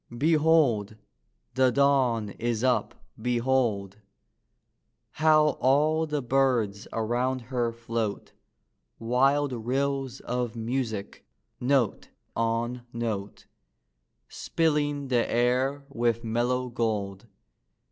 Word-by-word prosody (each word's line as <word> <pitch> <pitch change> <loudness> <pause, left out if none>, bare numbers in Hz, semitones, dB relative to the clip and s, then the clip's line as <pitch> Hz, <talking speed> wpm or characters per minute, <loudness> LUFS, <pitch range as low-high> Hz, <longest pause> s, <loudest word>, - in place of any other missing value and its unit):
Behold! 150 -8 +3 0.6
the 130 0 +4
Dawn 125 -6 +2
is 115 +1 -2
up: 125 -1 0 0.2
behold! 120 -5 0 1.1
How 155 -1 +4
all 155 +4 +2
the 150 -2 -2
birds 120 -6 +1
around 120 +4 -1
her 120 -2 +1
float, 115 -2 -4 0.6
Wild 135 +4 +2
rills 135 +2 -2
of 120 -1 -3
music, 115 -3 -3 0.4
note 125 -3 +1 0.3
on 115 +2 -1
note, 110 -4 -4 0.8
Spilling 145 -3 -1
the 120 -2 +1
air 130 +4 +1
with 120 -3 -1
mellow 120 +3 0
gold. 105 -3 -2
125 Hz, 85 wpm, -27 LUFS, 115-135 Hz, 1.1 s, the